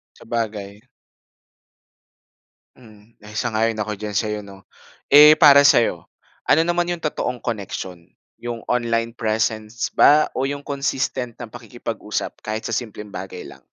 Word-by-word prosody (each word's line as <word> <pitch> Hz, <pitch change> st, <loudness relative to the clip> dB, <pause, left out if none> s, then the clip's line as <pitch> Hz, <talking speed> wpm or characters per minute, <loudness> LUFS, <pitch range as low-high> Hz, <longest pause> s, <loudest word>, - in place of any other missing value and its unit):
Sabagay. 105 Hz, -2 st, -5 dB, 1.9 s
Mm, 110 Hz, -2 st, -20 dB
eh, 105 Hz, 0 st, -10 dB
sang-ayon 115 Hz, -1 st, 0 dB
ako 105 Hz, 0 st, -3 dB
diyan 105 Hz, 0 st, -4 dB
sa'yo 105 Hz, -1 st, -1 dB
'no. 100 Hz, -1 st, -14 dB, 0.5 s
Eh, 150 Hz, +2 st, +9 dB
para 140 Hz, -2 st, +8 dB
sa 145 Hz, -, +6 dB
'yo, 115 Hz, -, 0 dB, 0.4 s
ano 160 Hz, -, +5 dB
naman 175 Hz, 0 st, 0 dB
'yong 175 Hz, -2 st, -4 dB
totoong 125 Hz, -4 st, -2 dB
koneksiyon, 95 Hz, -6 st, -6 dB, 0.3 s
'yong 120 Hz, -1 st, -6 dB
online 115 Hz, -1 st, -1 dB
presence 110 Hz, 0 st, -2 dB
ba 150 Hz, +1 st, +6 dB
o 135 Hz, +1 st, -1 dB
'yong 145 Hz, 0 st, -6 dB
consistent 135 Hz, -3 st, -3 dB
na 120 Hz, -, -7 dB
pakikipag-usap 115 Hz, -2 st, -6 dB
kahit 110 Hz, +1 st, -5 dB
sa 115 Hz, -, -3 dB
simpleng 105 Hz, -3 st, -5 dB
bagay 95 Hz, 0 st, -7 dB
lang? -, -, -13 dB
115 Hz, 135 wpm, -21 LUFS, 105-130 Hz, 1.9 s, Eh